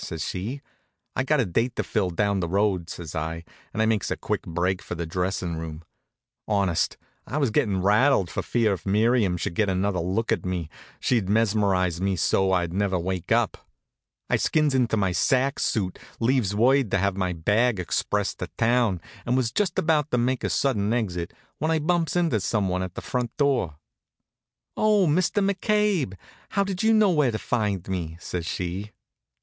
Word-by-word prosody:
says 80 -3 -4
she. 115 +10 -4 0.5
"I've 130 - -1
got 150 -1 +3
a - - +1
date 115 +7 0
to - - -1
fill 100 -5 0
down 100 +3 0
the 85 - -1
road," 95 -3 +1
says 80 -3 -7
I, 80 +1 -3 0.3
and 110 - 0
I - - +3
makes 110 -3 +1
a - - -2
quick - - -2
break 90 +3 -1
for - - -6
the 85 0 -3
dressin' 90 0 -2
room. 80 0 -6 0.6
Honest, 95 -6 +1 0.3
I 140 - -3
was 140 -6 +1
gettin' 100 -4 +1
rattled 105 +1 +4
for - - -2
fear 115 -4 +1
if 95 - -6
Miriam 105 -2 +2
should 90 +1 -3
get 105 +3 +1
another 95 0 0
look 95 +8 -1
at 110 -7 +1
me 90 -4 -3 0.3
she'd 115 -7 +1
mesmerize 100 -5 +2
me 95 0 +1
so 95 +3 +2
I'd 85 -2 +1
never 95 -1 +1
wake 90 0 -3
up. - - +1 0.6
I - - +2
skins 155 -2 +2
into 120 -4 +2
my 95 -3 +1
sack 135 +9 +1
suit, 95 -5 -1 0.2
leaves 115 -4 +1
word 130 +2 +3
to - - +2
have 100 0 +1
my 95 -2 -1
bag 105 +7 +1
expressed 100 +3 -1
to - - -3
town, 115 -6 +2 0.2
and 125 +1 +1
was 120 -4 0
just 185 +5 0
about 155 -2 +2
to 125 - +1
make 125 +1 0
a - - 0
sudden 110 -7 +1
exit 90 -8 -2 0.3
when 155 - 0
I 160 - +3
bumps 165 +2 0
into 165 -11 +2
some 100 0 0
one 90 0 -1
at 95 -1 -5
the - - -5
front 125 -2 -3
door. 130 - +1 1.0
"Oh, 210 -3 +3
Mr. 185 +5 +2
McCabe! 200 - +1 0.3
How 200 - +1
did 195 -2 -3
you 220 - +4
know 215 -3 +5
where 150 -6 +3
to 110 - -2
find 105 -5 -1
me?" 85 -4 -3
says 85 -2 -4
she. 95 +4 -3
105 Hz, 190 wpm, -25 LUFS, 90-130 Hz, 1.0 s, know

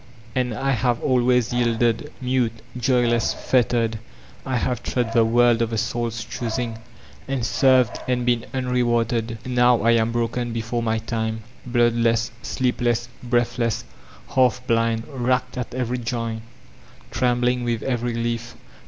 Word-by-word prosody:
*' 115 +1 -23
And 125 -1 0
I 135 +5 0
have 120 -1 +1
always 125 -2 +2
yielded: 120 +2 +1
mute, 125 -3 -1
joyless, 120 -2 +2
fettered, 115 -3 +1 0.5
I 130 -2 0
have 120 -1 -1
trod 120 -3 -1
the 115 -1 +5
world 120 +1 +4
of 115 - +1
the 115 - -2
Soul's 115 +1 -2
choosing, 115 -1 -3 0.5
and 135 -3 -1
served 130 -1 +3
and 125 -1 0
been 120 -2 +1
unrewarded. 120 -3 0
Now 125 -2 +3
I 115 - +5
am 115 0 +2
broken 120 0 -1
before 115 +1 -2
my 110 -1 0
time; 110 0 -3 0.2
bloodless, 120 -1 +2
sleepless, 120 -2 0
breathless, 120 -2 0 0.2
— - - -22
^half 125 -1 +2
blind, 115 -1 +1
racked 125 -2 -1
at 125 -1 -4
every 125 -1 -1
joint, 115 -1 -3 0.7
trembling 125 0 +1
with 120 -2 -1
every 120 -2 -1
leaf. 115 0 -3
120 Hz, 140 wpm, -23 LUFS, 115-125 Hz, 0.7 s, the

